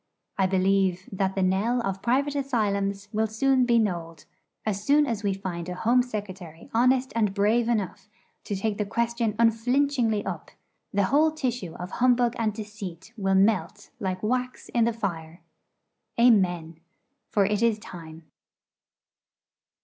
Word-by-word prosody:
I 190 -2 +2
believe 190 -1 +1
that 195 -1 -1
the 190 - +1
knell 200 +7 +1
of 195 -3 -3
private 275 +4 +1
asylums 205 -7 -1
will 220 +1 +1
soon 255 +3 +2
be 235 -1 +4
knolled. 170 -7 -2 0.4
As 205 -2 -2
soon 295 +6 +4
as 230 -6 -2
we 200 -2 0
find 180 -3 -5
a 180 - -4
Home 240 +6 +3
Secretary 190 -8 -7
honest 255 +3 +2
and 210 -4 +1
brave 225 +4 +2
enough 210 -3 -2 0.4
to 205 - -3
take 205 +2 -2
the 210 - 0
question 235 0 -1
unflinchingly 230 0 +2
up, - - -5 0.4
the 200 0 +2
whole 310 +2 +5
tissue 245 - -3
of 180 +1 -7
humbug 245 -1 +2
and 220 -2 +1
deceit 210 -2 -8
will 195 -3 0
melt 200 0 +1
like 185 -1 -3
wax 250 +3 -2
in 235 -2 +2
the 235 - +2
fire. 170 -6 -5 0.8
Amen. 175 -9 +3 0.5
For 200 -2 +2
it 210 +2 0
is 230 -2 +3
time. 165 -5 -11
210 Hz, 150 wpm, -26 LUFS, 190-235 Hz, 0.8 s, whole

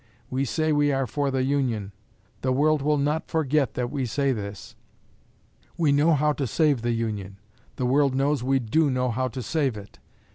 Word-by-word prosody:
We 130 +1 0
say 155 +5 0
we 145 -1 +3
are 135 -1 0
for 140 +4 -1
the 130 -1 0
Union. 125 -7 -1 0.5
The 130 - 0
world 150 +3 +2
will 150 +1 +2
not 150 +3 -1
forget 150 -6 +1
that 125 -1 -2
we 135 -3 -2
say 140 +3 0
this. 100 -4 -6 1.0
We 160 -4 +3
know 150 +3 +4
how 150 +1 +2
to 140 -2 -2
save 145 0 +2
the 120 0 0
Union. 105 -4 -3 0.4
The 125 - -2
world 135 +1 +2
knows 140 0 +1
we 135 +1 +2
do 135 +6 +1
know 125 -1 0
how 130 +3 -1
to 130 0 -6
save 140 -7 -1
it. 100 0 -12
135 Hz, 190 wpm, -25 LUFS, 120-145 Hz, 1.0 s, know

